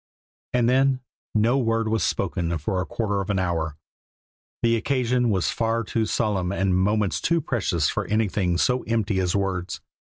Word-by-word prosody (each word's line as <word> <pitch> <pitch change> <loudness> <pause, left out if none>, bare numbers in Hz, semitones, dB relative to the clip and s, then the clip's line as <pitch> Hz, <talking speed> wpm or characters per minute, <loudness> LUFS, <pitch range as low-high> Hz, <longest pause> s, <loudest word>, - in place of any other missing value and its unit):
And 120 -2 +3
then 130 +1 +3 0.3
no 115 +5 +3
word 115 -2 +1
was 110 0 +1
spoken 85 -1 -1
for 90 +5 -2
a 90 - -4
quarter 100 -3 -1
of 100 - -6
an 100 - +1
hour. 80 -4 -1 0.9
The 115 0 +4
occasion 125 0 +1
was 95 -4 +1
far 115 0 0
too 110 +1 -1
solemn 95 -5 0
and 95 -2 +1
moments 100 +2 +1
too 170 0 +2
precious 100 - 0
for - - -2
anything 100 -4 +1
so 125 +6 +2
empty 110 -3 0
as 90 0 0
words. 95 -2 -2
105 Hz, 165 wpm, -24 LUFS, 95-115 Hz, 0.9 s, The